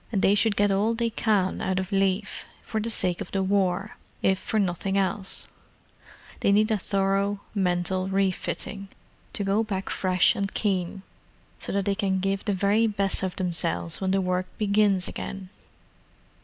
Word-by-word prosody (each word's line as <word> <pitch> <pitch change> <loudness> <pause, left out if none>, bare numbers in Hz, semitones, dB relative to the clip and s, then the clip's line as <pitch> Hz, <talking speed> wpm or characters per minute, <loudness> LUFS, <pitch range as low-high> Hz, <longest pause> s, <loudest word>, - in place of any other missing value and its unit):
And 200 -4 0
they 195 - +5
should 210 +1 +2
get 205 0 +3
all 205 +4 +2
they 230 0 0
can 205 -4 +1
out 190 -1 0
of 190 +1 -2
leave, 195 +1 0 0.2
for 220 - -2
the 230 - -2
sake 180 -5 -1
of - - -5
the 195 -1 0
War, 195 0 0 0.3
if 190 0 +3
for 220 - -2
nothing 195 0 0
else: 195 0 -1 0.9
they - - +3
need 215 +2 +4
a 215 - +3
thorough 195 +1 0
mental 185 -1 0
re 195 0 +2
fitting, 195 +2 -5 0.5
to 205 - 0
go 200 +3 +2
back 195 -3 -3
fresh 185 -1 +3
and 195 0 -2
keen, 190 -2 -1 0.6
so - - -3
that 200 -1 0
they 200 - +2
can 195 -2 0
give 195 +1 -1
the 210 - +1
very 205 +4 +3
best 200 -2 -1
of 190 -1 -2
themselves 125 - -2
when 190 - 0
the 195 +1 +2
work 185 0 0
begins 200 -3 +2
again." 195 -1 -6
195 Hz, 175 wpm, -26 LUFS, 185-205 Hz, 0.9 s, they